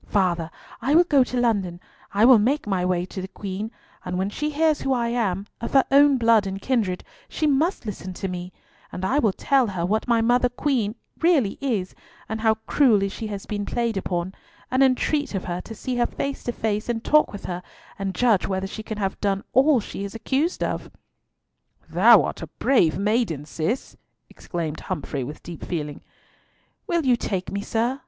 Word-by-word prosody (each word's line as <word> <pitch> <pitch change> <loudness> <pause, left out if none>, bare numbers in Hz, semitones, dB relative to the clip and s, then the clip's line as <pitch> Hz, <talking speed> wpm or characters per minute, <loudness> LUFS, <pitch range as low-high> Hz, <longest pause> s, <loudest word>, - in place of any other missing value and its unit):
Father, 175 -5 +1 0.3
I 275 +6 +2
will 345 - +8
go 285 -6 +4
to 250 0 -4
London, 200 -8 0 0.3
I 205 +3 +4
will 250 -3 +8
make 270 +8 +1
my 190 -3 0
way 180 -1 0
to 190 +1 -7
the 185 - -5
Queen, 200 +2 -5 0.3
and 180 0 -3
when 190 +2 -1
she 300 +7 -2
hears 310 0 +2
who 270 - +1
I 235 -2 0
am—of 210 -1 -3
her 270 -1 +5
own 280 0 +6
blood 230 -4 +4
and 195 0 -4
kindred—she 220 - -2
must 300 +2 +1
listen 190 -3 -5
to 190 - -4
me; 180 0 -5 0.4
and 185 - -4
I 270 +9 +2
will 220 -7 +3
tell 265 +5 +2
her 180 -4 -2
what 215 +6 0
my 235 -1 +3
mother 245 +2 +3
Queen 245 -4 -1 0.2
really 305 - +2
is, 220 -9 -1 0.3
and 220 0 -4
how 220 -1 +3
cruelly 215 -9 +3
she 220 +3 -6
has 200 -2 -6
been 205 -1 -3
played 235 +1 -1
upon, 185 -1 -2 0.4
and 260 +1 +2
entreat 270 0 +2
of 190 - -3
her 175 0 -3
to 225 - -9
see 250 +3 -3
her 240 - +2
face 275 0 -4
to 240 - 0
face 215 -1 -2
and 230 -1 -1
talk 305 0 +4
with 205 - -8
her, 180 0 -4 0.4
and 195 -1 -3
judge 230 -4 +3
whether 190 0 -1
she 205 +3 -6
can 215 0 -6
have 195 -2 -2
done 195 -1 0
all 270 +1 +5
she 200 - -6
is 200 +2 -6
accused 275 +9 0
of." - - -3 1.0
"Thou - - +6
art - - -4
a - - -5
brave 175 -13 +2
maiden, 200 - 0
Cis," 165 - -3 0.4
exclaimed 160 -3 -5
Humfrey 150 -6 -4
with 145 +5 -8
deep 170 -2 -8
feeling. 150 -4 -4 0.9
"Will 340 -3 0
you 250 -2 +5
take 190 -5 -3
me, 200 - -2
sir?" 235 +5 -1
215 Hz, 195 wpm, -24 LUFS, 190-255 Hz, 1.0 s, will